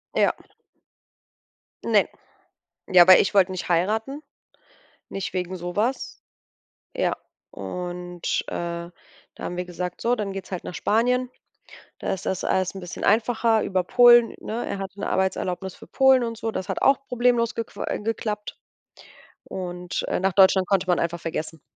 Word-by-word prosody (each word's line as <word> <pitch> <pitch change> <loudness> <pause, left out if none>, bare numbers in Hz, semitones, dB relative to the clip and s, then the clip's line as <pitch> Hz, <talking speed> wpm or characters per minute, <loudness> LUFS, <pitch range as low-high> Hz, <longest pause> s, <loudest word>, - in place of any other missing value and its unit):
Ja. - - +3 1.5
Ne. - - +3 0.8
Ja, 180 -2 +8
weil 185 0 +9
ich 200 - 0
wollte 190 -1 +4
nicht 185 - -5
heiraten, 220 - 0 0.9
nicht 195 -2 -5
wegen 185 0 -3
so 175 0 -6
was. 240 +6 -2 0.8
Ja, - - 0 0.3
und, 180 -1 -4
äh, 170 0 -4 0.4
da - - -9
haben 180 - -4
wir 180 - -2
gesagt: 180 0 -5
„So, 240 +1 +1
dann 205 -3 -3
geht's 195 0 -7
halt 185 -2 -5
nach - - -7
Spanien, 250 +5 +1 0.7
da - - -2
ist 190 - -4
das 190 - -2
alles 185 -1 +1
bisschen 180 -2 -8
einfacher.“ 225 +1 +2
Über 185 -1 0
Polen, 240 +3 +6
ne 230 +3 -4
er - - -4
hatte 195 0 -7
'ne - - -2
Arbeitserlaubnis 190 0 -1
für - - -15
Polen 265 -1 +4
und 230 -1 -4
so, 225 -1 -3
das 190 -1 -4
hat 190 - -3
auch 275 0 +3
problemlos 245 -1 +2
gequa 230 - -5
äh, - - -2
geklappt 210 -1 -4 0.9
und, 180 -1 -5
äh, - - -1
nach 190 +1 +1
Deutschland 190 -1 +5
konnte 195 -1 +2
man 180 -2 +2
einfach 170 0 -2
vergessen. 160 -1 -5
190 Hz, 155 wpm, -24 LUFS, 180-230 Hz, 1.5 s, weil